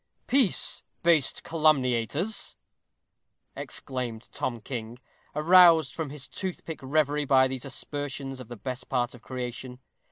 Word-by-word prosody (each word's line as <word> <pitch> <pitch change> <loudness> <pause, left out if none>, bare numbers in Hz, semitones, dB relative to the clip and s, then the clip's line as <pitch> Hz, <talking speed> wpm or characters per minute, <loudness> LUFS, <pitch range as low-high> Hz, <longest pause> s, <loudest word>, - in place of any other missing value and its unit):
_ - - -44
"Peace, 255 -6 +3 0.2
base 165 -5 +4
calumniators," 155 - +1 1.0
exclaimed 125 -4 -5
Tom 120 -2 -3
King, 115 0 -6 0.4
aroused 165 -2 +6
from 160 -3 -4
his 140 -1 -7
toothpick 180 -4 -5
reverie 145 +2 +1
by 130 -1 +5
these 130 -1 -4
aspersions 140 -1 -4
of 130 - -9
the 120 0 -8
best 125 +4 -6
part 125 -1 0
of 125 - -13
creation. 125 0 -6
135 Hz, 125 wpm, -27 LUFS, 125-155 Hz, 1.0 s, aroused